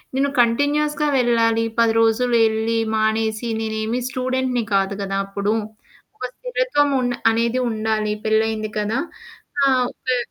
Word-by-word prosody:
నేను 280 +1 +1
కంటిన్యూయస్‌గా 295 +5 +1
వెళ్ళాలి. 230 -2 +2 0.2
10 230 -1 +4
రోజులు 235 +2 +2
ఎళ్ళి 225 +1 -1 0.2
మానేసి. 220 +1 0
నేనేమి 220 +2 -2
స్టూడెంట్‌ని 255 -1 -1
కాదు 195 0 +2
కదా! 195 0 -2
అప్పుడు. 200 +2 -1 0.6
ఒక - - -4
స్థిరత్వం - - 0
ఉండ 245 0 0 0.2
అనేది 235 +2 0
ఉండాలి 215 -1 -1
పెళ్ళయింది 220 0 0
కదా! 210 +2 -1 0.7
ఆ! - - +5 0.3
ఓకే. 255 -1 -2
230 Hz, 120 wpm, -21 LUFS, 220-255 Hz, 0.7 s, ఆ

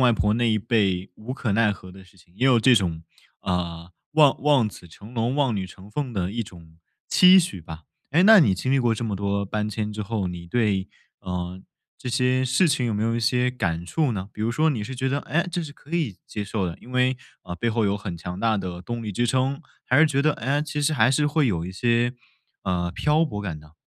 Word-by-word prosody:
外 125 -2 +5
婆 105 -1 +1
那 120 0 +1
一 110 - +2
辈 100 -4 0
无 120 +4 -6
可 120 -5 -2
奈 105 0 +3
何 95 -2 -11
的 95 0 -13
事 95 - -22
情， 90 -1 -23
也 130 - +2
有 130 -3 +5
这 125 +2 +6
种， 85 -6 0 0.4
呃， 85 -2 -3 0.2
望 150 -3 +5
望 140 -7 +4
子 90 - -13
成 100 +8 -13
龙 120 +2 -1
望 135 -6 +1
女 95 -2 -2
成 95 +2 -14
凤 130 +1 -3
的 95 -2 -2
一 115 +1 -2
种 85 -4 -15 0.3
期 185 +1 +7
许 175 - -1
吧。 80 0 -10 0.3
诶， 160 +6 +4
那 220 +3 +9
你 100 - +4
经 130 +8 -1
历 135 - +4
过 120 -3 +2
这 115 - -4
么 105 - -2
多 100 +1 -1
搬 105 +2 -2
迁 105 0 -3
之 105 - -4
后， 105 -2 -2
你 85 -1 -7
对， 100 -1 0 0.3
嗯， 90 0 -5 0.4
这 130 - -6
些 125 +1 +2
事 130 +8 +3
情 140 -5 +1
有 110 - -1
没 105 - -1
有 115 +1 +1
一 120 - -1
些 125 +2 +2
感 85 -9 -2
触 140 - 0
呢？ 100 0 -5
比 - - -10
如 110 +2 0
说 155 +7 +2
你 120 -8 -2
是 130 +5 -6
觉 130 +1 -1
得， 140 - 0
哎， 170 +6 -1
这 175 0 -1
是 145 - -8
可 155 +4 -9
以 150 - -1
接 105 - -5
受 100 -1 -2
的， 85 -2 -4
因 125 - -14
为， 125 0 +2 0.2
呃， 90 - -6
背 120 - -1
后 115 0 +1
有 100 0 +1
很 95 -4 -6
强 90 +2 -7
大 110 -2 +2
的 90 -2 -5
动 120 +6 -5
力 105 -2 -4
支 120 +5 0
撑， 130 +3 0 0.2
还 130 - +3
是 160 - +7
觉 140 -2 +1
得， 155 +1 +3
哎， 140 +5 -1
其 150 -1 -4
实 150 +2 +1
还 130 - +4
是 150 +3 +2
会 150 -1 +2
有 85 -7 -1
一 - - -5
些， 120 +4 +1 0.5
嗯， 90 -1 -1
漂 155 - +2
泊 105 -8 -5
感 80 -6 -5
的。 75 +1 -19
115 Hz, 270 characters per minute, -24 LUFS, 95-130 Hz, 0.5 s, 那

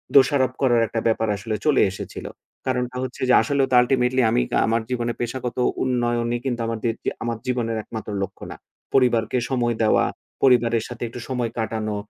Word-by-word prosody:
দোষারোপ 135 -2 +5
করার 120 -4 +4
একটা 115 - -2
ব্যাপার 110 0 +1
আসলে 110 +2 -3
চলে 150 -3 +4
এসেছিল। 95 - -7 0.4
কারণটা 125 -1 -1
হচ্ছে 130 0 -6
যে - - +6
আসলেও 140 -2 +1
তো - - +4
আল্টিমেটলি 125 0 +2
আমি 120 +2 +3 0.3
আমার 115 +1 +1
জীবনে 120 -1 -1
পেশাগত 120 +1 -3 0.3
উন্নয়নই 120 -1 0
কিন্তু 120 -3 -1
আমাদের 115 0 -1
যে, - - +1
আমার 115 -1 -2
জীবনের 120 -3 -1
একমাত্র 110 -1 -7
লক্ষ্য 95 0 -7
না। - - -7 0.4
পরিবারকে 120 -3 +3
সময় 120 -3 0
দেওয়া, 110 - +4 0.4
পরিবারের 120 -3 +4
সাথে 120 0 -7
একটু 125 - -8
সময় 125 -3 -1
কাটানো, 110 -1 -2
120 Hz, 170 wpm, -23 LUFS, 115-125 Hz, 0.4 s, যে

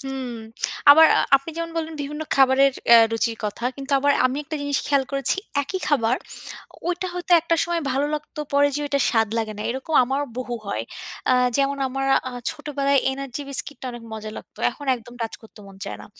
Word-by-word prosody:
হুম। 270 -2 -5 0.6
আবার 320 +3 +9
আ - - +4 0.2
আপনি 275 +4 -7
যেমন 335 0 -3
বললেন, 325 -1 -3
বিভিন্ন 300 +2 -5
খাবারের 270 0 +5 0.2
অ্যা 235 - +9
রুচির 225 0 0
কথা। 210 +3 -4
কিন্তু 275 0 -5
আবার 285 +1 +3
আমি 255 +1 -3
একটা 310 - -4
জিনিস 285 -1 0
খেয়াল 280 -2 +2
করেছি। 275 +2 +3 0.3
একই 375 +7 -4
খাবার, 250 -4 +2 0.7
ওইটা 355 +1 -2
হয়তো 355 0 -2
একটা 335 +1 0
সময় 340 0 -1
ভালো 275 +3 +1
লাগতো 300 0 -6
পরে 285 0 +4
যেয়ে 295 +1 -2
ওইটা 280 -1 0
স্বাদ 225 -2 +2
লাগে 220 -1 -2
না। - - -3
এরকম 265 +5 -4
আমারও 270 +3 -1
বহু 245 -1 -4
হয়। 110 - -2 0.5
আ - - +5 0.2
যেমন 280 0 +1
আমার 270 +1 -2 0.2
আ - - -6 0.2
ছোটবেলায় 280 -1 0
এনার্জি 275 +1 -5
বিস্কিটটা 275 0 -2
অনেক 240 -1 -9
মজা 215 0 -6
লাগত। - - -12
এখন 290 - -11
একদম 240 +1 -14
টাচ 225 -1 -3
করত 220 - -17
মন 195 -1 -13
চায় - - -6
না। - - -11
275 Hz, 195 wpm, -23 LUFS, 245-290 Hz, 0.7 s, আবার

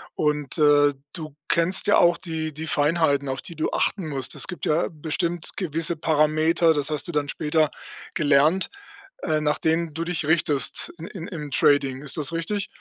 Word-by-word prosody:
und, 150 -1 -1
äh, 145 -1 +5 0.2
du 155 -4 -6
kennst 170 +4 +2
ja 205 - +5
auch 170 0 +4
die 160 -3 -4
die 160 +2 -6
Feinheiten, 145 -2 +1
auf 130 0 -3
die 170 - -9
du 155 - -2
achten 190 -6 -1
musst. 135 -3 -4
Es - - +1
gibt 180 -2 -6
ja 155 +3 +1
bestimmt 165 +2 -2
gewisse 165 -2 -1
Parameter, 160 +1 +3
das 145 -1 -1
hast 150 - -2
du 175 - -6
dann 145 -1 -1
später 155 +1 +1 0.5
gelernt, 150 +4 +3 0.5
äh, 155 -2 0
nach 150 0 0
denen 160 0 0
du 165 +2 -3
dich 170 -3 -2
richtest 150 -4 +1
in 165 0 -8
in 185 -5 -8
im 150 -7 -7
Trading. 135 -1 +2
Ist 150 - -1
das 150 0 0
richtig? 185 +5 -2
155 Hz, 185 wpm, -24 LUFS, 150-170 Hz, 0.5 s, äh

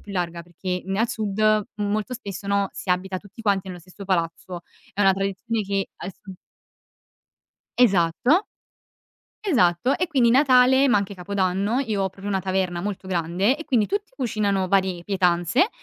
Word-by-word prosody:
più 205 - -11
larga 170 -2 -3
perché 175 +2 -25 0.2
ne 195 +2 -3
al 230 - +2
sud, 215 -1 +1
molto 210 +3 -2
spesso, 200 -5 -7
no, 200 -1 +1
si 185 - -5
abita 185 +1 -1
tutti 205 +3 -14
quanti 195 -3 0
nello 180 -1 -7
stesso 185 +3 -12
palazzo, 175 -1 -2 0.3
è 205 - -4
una 195 -1 +5
tradizione 195 +4 -2
che 195 -1 -2
adesso 195 0 -9 1.5
Esatto. 230 - +3 1.0
Esatto. 245 - +2
E 360 - -1
quindi 255 -7 +3
Natale, 265 0 +5
ma 220 - +4
anche 200 0 -2
Capodanno, 195 +4 -1
io 215 -7 -1
ho 190 - 0
proprio 195 +2 -9
una 190 -1 0
taverna 185 -2 -1
molto 195 -1 -5
grande, 185 - +1
e 320 - -8
quindi 230 -8 +2
tutti 405 0 -3
cucinano 210 -7 0
vari 190 -2 +1
pietanze 185 - +2
200 Hz, 160 wpm, -23 LUFS, 185-225 Hz, 1.5 s, una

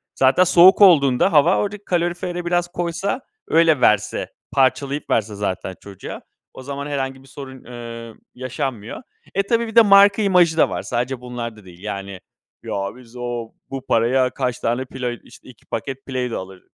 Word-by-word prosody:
zaten 135 +7 +4
soğuk 185 +2 +6
olduğunda 140 -10 +5
hava, 145 -2 +5
oradaki 205 0 -3
kalorifere 175 0 -2
biraz 175 0 +1
koysa, 175 +6 -3 0.3
öyle 160 -4 +3
verse, 105 -2 +2 0.2
parçalayıp 135 +2 0
verse 110 -1 0
zaten 95 -2 -4
çocuğa, 100 -1 -9 0.3
o 130 - -11
zaman 140 +1 -5
herhangi 135 -2 -4
bir - - -19
sorun, 130 -1 -10
ııı, 115 -2 -9 0.2
yaşanmıyor. 130 -3 -5 0.3
E, 195 - +2
tabii, 230 +3 0
bir 225 - -9
de 230 - +9
marka 200 0 +6
imajı 180 -5 +3
da - - +4
var, - - -3
sadece 125 +1 -3
bunlar 120 -2 -6
da 105 -2 -17
değil. 90 0 -15
Yani, 100 -2 -6 0.4
"Ya, - - -7 0.2
biz 125 -1 -16
o 120 -2 -5 0.2
bu 135 -1 -6
paraya 125 +3 +2
kaç 125 -1 -3
tane 120 +3 -1
Play 125 -2 -5
işte, - - -17
2 120 - -17
paket 135 +4 -6
Play-Dough 125 -3 -3
alır" 95 0 -9
130 Hz, 170 wpm, -21 LUFS, 115-170 Hz, 0.4 s, de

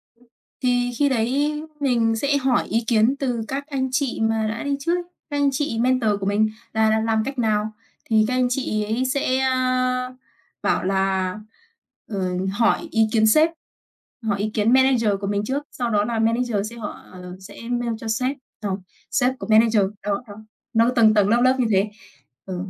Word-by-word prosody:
Ừm, 245 +2 -27 0.4
thì 245 -1 +1
khi 290 - +3
đấy 280 +5 0 0.2
mình 235 -5 +2
sẽ 280 +5 +1
hỏi 260 -3 +1
ý 230 +1 0
kiến 225 +2 +3
từ 250 -5 -1
các 280 +1 -4
anh 270 -3 -2
chị 270 -3 -1
mà 220 0 +1
đã 225 +2 -4
đi 285 -1 0
trước, 335 +5 +1 0.3
các 290 - -2
anh 285 0 +3
chị 260 -4 -2
mentor 250 -2 +2
của 195 - -3
mình 210 +2 +2 0.2
là 220 0 +3
là 220 0 +2
làm 220 0 +1
cách 275 +1 -5
nào? 215 -2 0 0.3
Thì 220 -1 +3
các 255 - 0
anh 255 0 +2
chị 230 -5 -1
ấy 225 +5 -1
sẽ, 260 -1 0
ơ, 255 -1 0 0.5
bảo 205 - +1
là, 190 -1 0 0.7
ờ, 200 -3 -3 0.3
hỏi 230 +10 +1
ý 225 -4 +3
kiến 220 -1 +4
sếp, 310 +9 +5 0.7
hỏi 205 -3 -1
ý 215 +1 -1
kiến 215 +2 +2
manager 260 -4 +4
của 200 - -3
mình 205 0 0
trước. 270 +6 -2
Sau 245 -4 -3
đó 205 -2 +2
là 230 0 -2
manager 225 -2 0
sẽ 235 - -11
họ 220 -3 -5 0.2
ờ, 180 0 -9
sẽ 195 +2 -12
mail 240 -1 -1
cho 225 - -7
sếp, 255 +5 -1 0.2
ờ, 200 -4 -2 0.3
sếp 255 -1 +2
của - - -6
manager. 220 -1 +5 0.2
Đó, 200 +1 -2
đó, 205 - -9 0.4
nó 230 +2 +4
tầng 220 -2 +6
tầng 205 -2 +3
lớp 235 +3 +3
lớp 255 +1 +4
như 245 - +2
thế. 200 +1 +2 0.6
Ừ. 185 -2 -4
230 Hz, 195 wpm, -22 LUFS, 215-255 Hz, 0.7 s, tầng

